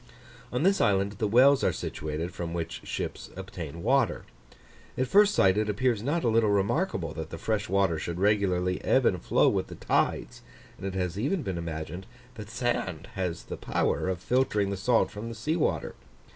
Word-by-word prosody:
On 125 Hz, +5 st, -1 dB
this 195 Hz, +2 st, +3 dB
island 100 Hz, -2 st, +2 dB
the 110 Hz, -, +1 dB
wells 130 Hz, +6 st, +5 dB
are -, -, +3 dB
situated, 80 Hz, +4 st, -4 dB
from 85 Hz, -1 st, -5 dB
which 85 Hz, -1 st, -4 dB
ships -, -, -5 dB
obtain 85 Hz, -4 st, -7 dB
water. 135 Hz, -3 st, +2 dB, 0.7 s
At 130 Hz, -, +1 dB
first 205 Hz, +8 st, +5 dB
sight 95 Hz, +2 st, +4 dB
it 105 Hz, 0 st, 0 dB
appears 115 Hz, +1 st, +1 dB
not 150 Hz, +8 st, -1 dB
a -, -, +2 dB
little 115 Hz, -1 st, +3 dB
remarkable 100 Hz, -, 0 dB
that 80 Hz, -1 st, -6 dB
the 80 Hz, -, -6 dB
fresh 105 Hz, +3 st, -2 dB
water 95 Hz, -4 st, +2 dB
should 85 Hz, +2 st, -4 dB
regularly 95 Hz, -3 st, +1 dB
ebb 130 Hz, -1 st, +3 dB
and 90 Hz, -5 st, +2 dB
flow -, -, +3 dB
with -, -, +1 dB
the -, -, -9 dB
tides; -, -, -1 dB, 0.4 s
and 95 Hz, -, -4 dB
it 95 Hz, -, -4 dB
has 90 Hz, 0 st, -2 dB
even 150 Hz, -, 0 dB
been 95 Hz, -3 st, -3 dB
imagined, 85 Hz, +3 st, -5 dB, 0.3 s
that 110 Hz, -3 st, -9 dB
sand 115 Hz, -8 st, -2 dB
has 90 Hz, -3 st, -3 dB
the -, -, -7 dB
power -, -, 0 dB
of 95 Hz, -, -1 dB
filtering 105 Hz, -4 st, +1 dB
the -, -, -1 dB
salt 115 Hz, +5 st, +2 dB
from 105 Hz, +3 st, -6 dB
the 115 Hz, -, -7 dB
sea 150 Hz, +9 st, -1 dB
water. 170 Hz, -, 0 dB
100 Hz, 190 wpm, -28 LUFS, 90-120 Hz, 0.7 s, wells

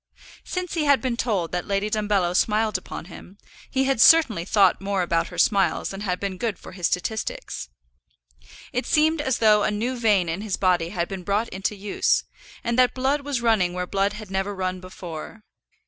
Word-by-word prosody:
Since 365 Hz, -2 st, -4 dB
he 320 Hz, -3 st, 0 dB
had 280 Hz, -2 st, +5 dB
been 250 Hz, 0 st, -2 dB
told 205 Hz, -8 st, -1 dB
that 180 Hz, 0 st, -3 dB
Lady 200 Hz, 0 st, 0 dB
Dumbello 205 Hz, -4 st, 0 dB
smiled 215 Hz, +2 st, +2 dB
upon 185 Hz, -, -5 dB
him, 185 Hz, +2 st, -13 dB, 0.3 s
he 265 Hz, -, +1 dB
had 270 Hz, -3 st, +1 dB
certainly 240 Hz, -, +6 dB
thought 195 Hz, -2 st, +3 dB
more 195 Hz, -1 st, 0 dB
about 165 Hz, -1 st, 0 dB
her -, -, -10 dB
smiles 195 Hz, -4 st, +2 dB
than 195 Hz, 0 st, -7 dB
had 180 Hz, -3 st, -2 dB
been 195 Hz, -2 st, -4 dB
good 225 Hz, -3 st, -2 dB
for -, -, -12 dB
his 180 Hz, -3 st, -1 dB
statistics. 185 Hz, -, -3 dB, 1.0 s
It 250 Hz, -, -2 dB
seemed 315 Hz, 0 st, +3 dB
as 265 Hz, -4 st, 0 dB
though 215 Hz, -2 st, +5 dB
a -, -, +1 dB
new 225 Hz, +5 st, -2 dB
vein 210 Hz, -7 st, +2 dB
in 165 Hz, +4 st, -3 dB
his 210 Hz, -3 st, -2 dB
body 180 Hz, -3 st, +1 dB
had 175 Hz, -2 st, -2 dB
been 195 Hz, -1 st, -6 dB
brought 205 Hz, +5 st, -1 dB
into 195 Hz, +2 st, -3 dB
use, 200 Hz, 0 st, +1 dB, 0.4 s
and 235 Hz, +1 st, 0 dB
that 250 Hz, -1 st, +4 dB
blood 270 Hz, +3 st, +1 dB
was 280 Hz, -3 st, -2 dB
running 215 Hz, -7 st, +2 dB
where 180 Hz, 0 st, -2 dB
blood 195 Hz, +2 st, 0 dB
had 210 Hz, -2 st, -9 dB
never 195 Hz, +1 st, -2 dB
run 185 Hz, -1 st, -2 dB
before. 185 Hz, +3 st, -9 dB
205 Hz, 195 wpm, -24 LUFS, 185-235 Hz, 1.0 s, certainly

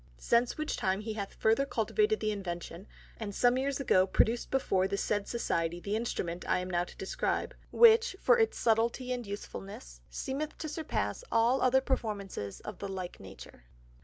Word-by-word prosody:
Since 235 Hz, -, +1 dB
which 310 Hz, 0 st, -2 dB
time 190 Hz, +2 st, 0 dB
he 220 Hz, 0 st, -4 dB
hath 200 Hz, -2 st, -5 dB
further 225 Hz, +5 st, +3 dB
cultivated 420 Hz, -, +1 dB
the 215 Hz, -, +1 dB
Invention, 180 Hz, -1 st, -6 dB, 0.3 s
and 205 Hz, -3 st, -5 dB
some 245 Hz, 0 st, +4 dB
Years 270 Hz, +1 st, -1 dB
ago 185 Hz, -8 st, +3 dB
produced 230 Hz, +5 st, +1 dB
before 190 Hz, -8 st, +1 dB
the 200 Hz, +1 st, -2 dB
said 205 Hz, 0 st, -1 dB
Society, 170 Hz, -7 st, -1 dB
the 200 Hz, +4 st, -2 dB
Instrument 180 Hz, -6 st, -3 dB
I -, -, +3 dB
am 180 Hz, 0 st, -4 dB
now 175 Hz, 0 st, +1 dB
to -, -, -14 dB
describe, 190 Hz, -, -2 dB, 0.2 s
which 460 Hz, -2 st, +6 dB
for 485 Hz, -1 st, +4 dB
its 450 Hz, -, +2 dB
subtilty 235 Hz, +3 st, +1 dB
and 245 Hz, -3 st, -5 dB
usefulness, 195 Hz, -, -8 dB
seemeth 275 Hz, -, -4 dB
to 310 Hz, -, -5 dB
surpass 315 Hz, +9 st, -3 dB
all 235 Hz, +3 st, +3 dB
other 260 Hz, +1 st, +4 dB
performances 200 Hz, -, -3 dB
of 210 Hz, -3 st, -8 dB
the 200 Hz, -, -4 dB
like 185 Hz, -2 st, -6 dB
Nature. 95 Hz, -10 st, -12 dB
220 Hz, 175 wpm, -31 LUFS, 190-260 Hz, 0.3 s, which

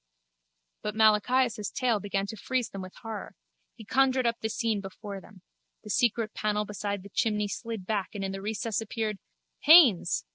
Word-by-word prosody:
But 210 Hz, 0 st, -4 dB
Malachias' 220 Hz, +1 st, +3 dB
tale 240 Hz, -4 st, +1 dB
began 195 Hz, 0 st, -2 dB
to 210 Hz, -, -6 dB
freeze 250 Hz, +3 st, -2 dB
them 195 Hz, -, -6 dB
with 185 Hz, 0 st, -9 dB
horror. 225 Hz, -2 st, -6 dB, 0.4 s
He 225 Hz, -, -12 dB
conjured 260 Hz, +2 st, +2 dB
up 235 Hz, 0 st, 0 dB
the 220 Hz, -, -1 dB
scene 220 Hz, -2 st, -1 dB
before 195 Hz, 0 st, -8 dB
them. 190 Hz, -3 st, -17 dB, 0.4 s
The 210 Hz, -, -6 dB
secret 230 Hz, -1 st, +1 dB
panel 210 Hz, 0 st, -1 dB
beside 205 Hz, -1 st, -4 dB
the 200 Hz, -, -11 dB
chimney 210 Hz, 0 st, 0 dB
slid 225 Hz, -2 st, -5 dB
back 205 Hz, -1 st, -2 dB
and 200 Hz, -, -3 dB
in 195 Hz, -, -2 dB
the 195 Hz, 0 st, -6 dB
recess 220 Hz, +1 st, -2 dB
appeared... 215 Hz, -2 st, -3 dB, 0.4 s
Haines! 285 Hz, -, +6 dB
215 Hz, 175 wpm, -28 LUFS, 200-230 Hz, 0.4 s, Haines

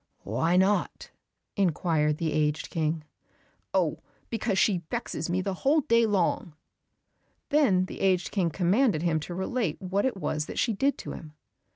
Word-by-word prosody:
"Why 160 Hz, -, +1 dB
not?" 195 Hz, +2 st, +1 dB, 0.4 s
inquired 160 Hz, -5 st, +1 dB
the 160 Hz, -2 st, -1 dB
aged 150 Hz, 0 st, 0 dB
King. 160 Hz, -1 st, -1 dB, 0.7 s
"Oh, -, -, +1 dB, 0.3 s
because 220 Hz, -4 st, -1 dB
she 190 Hz, -3 st, +3 dB
vexes 160 Hz, +3 st, -3 dB
me 180 Hz, +2 st, +1 dB
the 195 Hz, +1 st, -2 dB
whole 285 Hz, -, +2 dB
day 230 Hz, -3 st, +3 dB
long." 180 Hz, -5 st, 0 dB, 0.9 s
Then 265 Hz, -12 st, +3 dB
the -, -, -9 dB
aged 190 Hz, -2 st, +2 dB
King 185 Hz, -5 st, +1 dB
commanded 185 Hz, -, +2 dB
him 165 Hz, -2 st, +1 dB
to 175 Hz, +3 st, -7 dB
relate 190 Hz, -2 st, -2 dB
what 195 Hz, +5 st, 0 dB
it 255 Hz, -, -3 dB
was 155 Hz, -4 st, -2 dB
that -, -, -7 dB
she 230 Hz, -, +1 dB
did 275 Hz, +7 st, +1 dB
to -, -, -7 dB
him. 155 Hz, -1 st, -9 dB
185 Hz, 160 wpm, -27 LUFS, 160-205 Hz, 0.9 s, she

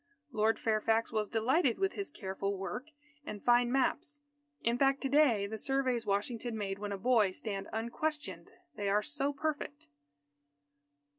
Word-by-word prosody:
Lord 220 Hz, -1 st, +2 dB
Fairfax 225 Hz, +1 st, +1 dB
was 215 Hz, -2 st, 0 dB
delighted 250 Hz, +4 st, +2 dB
with 390 Hz, 0 st, +1 dB
his 395 Hz, -4 st, -4 dB
careful 195 Hz, -5 st, -3 dB
work 220 Hz, +8 st, -5 dB, 0.4 s
and 210 Hz, -7 st, -7 dB
fine 240 Hz, 0 st, +4 dB
maps. 290 Hz, +2 st, 0 dB, 0.4 s
In 235 Hz, +1 st, +2 dB
fact, 275 Hz, +2 st, +3 dB
to 270 Hz, -, -1 dB
day 260 Hz, -8 st, +4 dB
the 220 Hz, +2 st, -5 dB
surveys 260 Hz, -4 st, 0 dB
Washington 220 Hz, +3 st, -1 dB
made 195 Hz, -2 st, -3 dB
when 205 Hz, 0 st, -4 dB
a 200 Hz, -, -2 dB
boy, 220 Hz, -1 st, +4 dB
stand 195 Hz, +1 st, -5 dB
unquestioned; 290 Hz, +7 st, -3 dB, 0.3 s
they 205 Hz, -2 st, -1 dB
are 210 Hz, +1 st, +3 dB
so 290 Hz, -1 st, -1 dB
perfect. 290 Hz, 0 st, -3 dB
235 Hz, 150 wpm, -33 LUFS, 210-275 Hz, 0.4 s, fine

